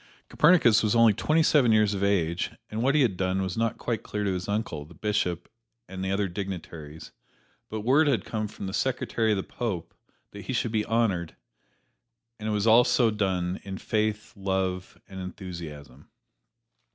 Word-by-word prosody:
Copernicus 150 -9 +5
was 110 +1 +1
only 115 -2 +6
twenty 155 +10 +2
seven 135 -7 +4
years 105 -1 +4
of 100 0 -2
age, 85 -4 +1 0.2
and 110 +1 -2
what 135 +4 +2
he 150 - +4
had 110 -7 +1
done 95 +1 0
was 95 -1 -3
not 115 0 0
quite 115 -3 -2
clear 105 0 -4
to 100 -2 0
his 90 +2 -4
uncle, 100 -8 -2
the 80 +4 -15
bishop, 100 -5 -1 0.4
and 95 0 -6
the 95 - -2
other 100 0 +1
dignitaries, 85 -5 -7 0.6
but 110 0 -4
word 140 +8 +4
had 135 -5 +1
come 110 -1 -3
from 100 - -8
the 95 - -5
secretary 120 +1 0
of 105 - +2
the 95 - -2
Pope 105 -9 -4 0.4
that 100 -1 -10
he 130 - -3
should 120 -2 -1
be 110 -2 +1
honored, 100 -8 0 1.0
and 110 0 -3
it - - 0
was 105 0 0
all 115 +2 +7
so 125 -2 +3
done, 95 -3 -1
in 95 -1 -6
faith, 110 0 -2
love 95 -2 -2
and 95 - -9
enthusiasm. 85 -7 -8
105 Hz, 185 wpm, -27 LUFS, 95-115 Hz, 1.0 s, all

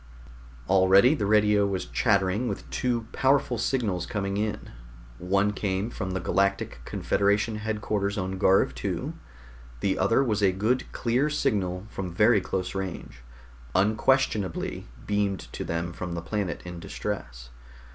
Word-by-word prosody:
Already 95 - +6
the 105 -10 -1
radio 105 -1 +4
was 95 -2 -2
chattering 100 0 +1
with 100 - -4
two 120 -3 -1
powerful 135 -3 +2
signals 110 -8 -1
coming 100 -3 -2
in. 105 0 -3 0.5
One 100 +3 +1
came 100 +2 -2
from 95 - -4
the 95 - -1
Galactic 100 +3 0
Confederation 105 +2 +1
headquarters 105 -2 -2
on 95 -1 -3
Garv 95 +1 +4
II; - - -2 0.7
the 95 +6 0
other 115 +8 +3
was 110 -5 0
a 95 -2 +4
good 110 +7 0
clear 125 +5 +1
signal 100 -11 -1
from 95 -2 -4
very 105 +1 +5
close 90 0 -3
range, 95 -8 -5 0.6
unquestionably 110 - +1 0.2
beamed 100 -3 0
to - - -4
them 85 +1 -3
from 90 -1 -5
the 85 - -3
planet 100 -1 -3
in 90 -1 -7
distress. - - -6
100 Hz, 135 wpm, -27 LUFS, 95-110 Hz, 0.7 s, Already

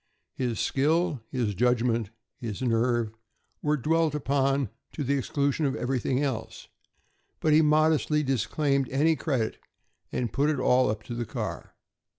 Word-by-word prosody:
His 120 -4 -2
skill, 155 +1 +1
his 120 -6 -1
judgment, 115 0 +1 0.3
his 115 0 -5
nerve, 120 -1 +1 0.5
were 150 0 +1
dwelt 160 +2 +1
upon 135 -3 +1 0.2
to 150 - -3
the 140 +1 +1
exclusion 140 +2 0
of 135 - -1
everything 130 +2 0
else; 120 -6 -4 0.7
but 155 - +2
he 155 - +6
modestly 155 0 +3
disclaimed 135 +1 0
any 155 +5 +3
credit 130 -6 -1 0.5
and 120 -3 -2
put 145 +2 +2
it 150 -3 0
all 130 -1 +3
up 105 0 -3
to 120 - -7
the 120 -1 -3
car. - - -5
135 Hz, 145 wpm, -27 LUFS, 120-150 Hz, 0.7 s, he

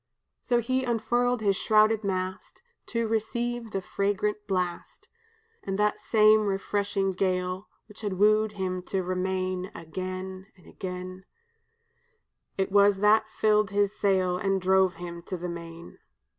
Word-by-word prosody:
"So 240 -2 +1
he 255 +3 0
unfurled 240 0 0
his 200 -2 +2
shrouded 215 +2 +3
mast 185 - -4 0.2
To 230 -1 -1
receive 235 +2 -2
the 195 -3 -3
fragrant 205 +2 -1
blast, 180 -3 -3 0.5
And 195 -1 -3
that 210 0 +1
same 215 -1 +4
refreshing 195 0 -1
gale 185 +1 -1 0.2
Which 210 0 -13
had 205 -3 -2
woo'd 215 +2 +3
him 185 -2 -3
to 190 -1 -1
remain 185 0 -2
Again 185 +3 -6
and 180 - -21
again; 185 -1 -7 1.3
It 190 0 -1
was 200 0 +5
that 215 +1 +4
filled 215 -2 +2
his 205 +1 +1
sail 185 -3 +1
And 195 0 +1
drove 190 0 +3
him 170 -1 -7
to 185 - -3
the 175 +1 -5
main. 170 0 -9
195 Hz, 135 wpm, -27 LUFS, 185-215 Hz, 1.3 s, was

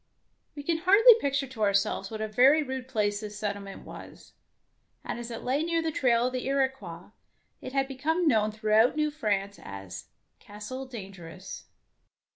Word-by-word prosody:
We 290 - -7
can 325 +2 0
hardly 405 +7 +7
picture 280 -3 0
to 255 -4 -10
ourselves 200 -1 +1
what 220 -1 -6
a 220 - -1
very 265 +8 +5
rude 260 -2 -5
place 210 -5 0
the 210 -1 -6
settlement 200 -1 -6
was, - - -12 0.7
and - - -5
as 240 0 -6
it 230 - -7
lay 265 +4 0
near 330 0 0
the 325 - -1
trail 240 -5 +2
of 255 - -1
the 255 0 -3
Iroquois, 265 -11 -2 0.5
it 255 - -8
had 270 -1 +1
become 320 +6 -1
known 215 -5 +3
throughout 215 +3 +3
New 300 0 0
France 200 -8 -2
as 95 -2 -8 0.3
"Castle 210 +6 -8
Dangerous. 190 -6 -9
240 Hz, 165 wpm, -28 LUFS, 205-275 Hz, 0.7 s, hardly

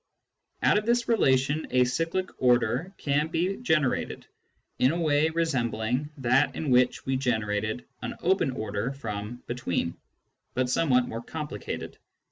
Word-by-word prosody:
Out - - +5
of 215 - -8
this 240 0 +2
relation 140 - +2
a 125 0 +4
cyclic 165 +8 -1
order 125 +6 +2
can 145 +1 +1
be 180 +4 -1
gen 160 -11 +2
erated, 130 - -2 0.6
in 130 - +4
a 170 - -2
way 155 -1 +3
resembling 130 -5 -1
that 130 0 +2
in 150 -4 -2
which 125 0 +3
we 135 - 0
generated 110 -3 -1 0.2
an - - -4
open 185 -4 +3
order 110 0 -3
from 115 -2 -6
" - - -42
between," 105 -8 -2 0.6
but 125 -1 +1
somewhat 125 -5 +3
more 115 - -5
complicated. 150 +4 -6
130 Hz, 145 wpm, -27 LUFS, 120-160 Hz, 0.6 s, Out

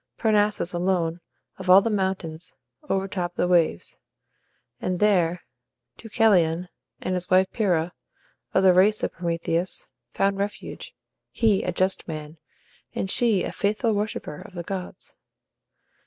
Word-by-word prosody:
Parnassus 210 -4 +1
alone, 175 -2 0 0.4
of 190 -1 -5
all 185 +1 +10
the 230 - 0
mountains, 180 -4 -3 0.3
overtopped 190 -2 -2
the - - +1
waves; 170 - +1 0.8
and 180 0 -2
there 180 -5 +2 0.5
Deucalion, 180 -6 +2 0.3
and 185 - -2
his 180 -1 -2
wife 185 +1 +5
Pyrrha, 180 -6 0 0.6
of 190 - +2
the 185 -1 +7
race 205 +4 +4
of - - 0
Prometheus, 170 +1 -2 0.2
found 195 0 0
refuge 205 +1 -5 0.3
he 220 -4 +2
a 180 - -2
just 185 +2 0
man, 155 -1 -7 0.6
and 190 - -1
she 225 -6 +2
a - - -3
faithful 215 +2 0
worshipper 205 -7 -3
of 195 - -13
the 175 - -4
gods. 185 0 -7
185 Hz, 130 wpm, -25 LUFS, 175-200 Hz, 0.8 s, all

